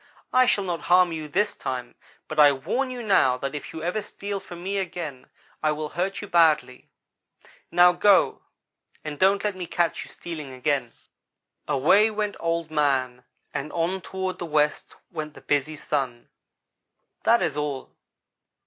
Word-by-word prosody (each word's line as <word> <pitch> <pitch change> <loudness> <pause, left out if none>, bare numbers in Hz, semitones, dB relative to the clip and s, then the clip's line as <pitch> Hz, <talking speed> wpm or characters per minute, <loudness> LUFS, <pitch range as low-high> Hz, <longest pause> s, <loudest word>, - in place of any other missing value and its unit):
I 255 0 +5
shall 200 - +2
not 175 -4 -3
harm 180 0 +6
you 155 -2 -4
this 195 +8 0
time, 125 -2 -5 0.3
but 155 - -4
I 145 -1 +8
warn 245 - -2
you 250 -1 -6
now, 135 - +4
that 135 +2 -4
if 150 - -6
you 160 - -7
ever 180 +5 -1
steal 200 -1 -5
from 175 -2 -10
me 195 +1 -1
again, 160 -8 -5 0.3
I 155 - +2
will 150 0 -4
hurt 185 +5 -2
you - - -6
badly. 155 -7 +2 0.8
Now 175 0 +6
go, 195 0 +4 0.6
and 150 -2 -6
don't 195 +1 +4
let 210 -2 -1
me 180 -2 -6
catch 170 0 0
you - - -13
stealing 155 -6 -7
again!' 130 -2 -1 0.7
"Away 190 +11 +4
went 210 -1 -2
Old 165 -1 -1
man, 135 -4 0 0.3
and 150 +1 -4
on 175 +3 -1
toward 190 0 -4
the 175 - -3
west 150 -1 0 0.2
went 155 -2 -6
the - - -12
busy 145 +2 0
Sun. 135 -5 -3 0.9
That 235 +1 +4
is 145 - -1
all. 145 -3 -3
165 Hz, 165 wpm, -25 LUFS, 145-190 Hz, 0.9 s, I